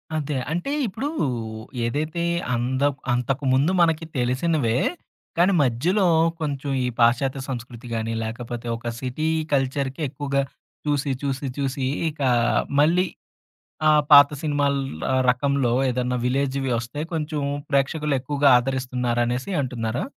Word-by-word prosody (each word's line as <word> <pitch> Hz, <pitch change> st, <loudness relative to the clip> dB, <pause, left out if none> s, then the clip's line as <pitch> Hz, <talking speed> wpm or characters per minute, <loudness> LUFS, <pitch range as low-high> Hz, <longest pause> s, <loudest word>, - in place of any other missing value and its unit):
అదే. 150 Hz, -1 st, -2 dB, 0.2 s
అంటే 175 Hz, -, -2 dB, 0.2 s
ఇప్పుడు, 225 Hz, +8 st, -3 dB, 0.8 s
ఏదైతే 155 Hz, +7 st, -2 dB, 0.3 s
అంద 130 Hz, +3 st, -1 dB, 0.3 s
అంతకుముందు 135 Hz, +4 st, +1 dB
మనకి 165 Hz, -1 st, +2 dB
తెలిసినవే 125 Hz, 0 st, +1 dB, 0.6 s
కానీ, 180 Hz, +3 st, +4 dB
మధ్యలో 165 Hz, -, +1 dB, 0.4 s
కొంచెం 145 Hz, -2 st, -3 dB
ఈ -, -, 0 dB
పాశ్చాత్య 130 Hz, +3 st, +3 dB
సంస్కృతి 120 Hz, -1 st, -6 dB
గానీ, 115 Hz, 0 st, -2 dB
లేకపోతే 120 Hz, +1 st, -5 dB
ఒక 120 Hz, +1 st, -5 dB
సిటీ 130 Hz, +5 st, -2 dB, 0.3 s
కల్చర్‌కి 135 Hz, +1 st, 0 dB
ఎక్కువగా 140 Hz, 0 st, -1 dB, 0.4 s
చూసి, 145 Hz, -2 st, 0 dB
చూసి, 135 Hz, 0 st, -2 dB
చూసి 135 Hz, -1 st, -1 dB, 0.2 s
ఇకా 145 Hz, -4 st, -1 dB, 0.5 s
మళ్ళీ 170 Hz, +5 st, +4 dB, 0.9 s
ఆ -, -, +6 dB, 0.2 s
పాత 145 Hz, 0 st, +10 dB
సినిమల 145 Hz, -2 st, +1 dB, 0.4 s
ఆహ్, 130 Hz, 0 st, +3 dB
రకంలో 135 Hz, -1 st, +1 dB, 0.2 s
ఏదన్నా 125 Hz, 0 st, -1 dB
విలేజ్‌వి 135 Hz, +1 st, 0 dB
ఒస్తే 120 Hz, +5 st, -5 dB
కొంచెం 155 Hz, -2 st, -2 dB, 0.3 s
ప్రేక్షకులు 145 Hz, +1 st, +1 dB
ఎక్కువగా 140 Hz, +2 st, +2 dB
ఆదరిస్తున్నారనేసి 125 Hz, +1 st, -1 dB
అంటున్నారా? 120 Hz, -2 st, -2 dB
135 Hz, 115 wpm, -23 LUFS, 125-150 Hz, 0.9 s, పాత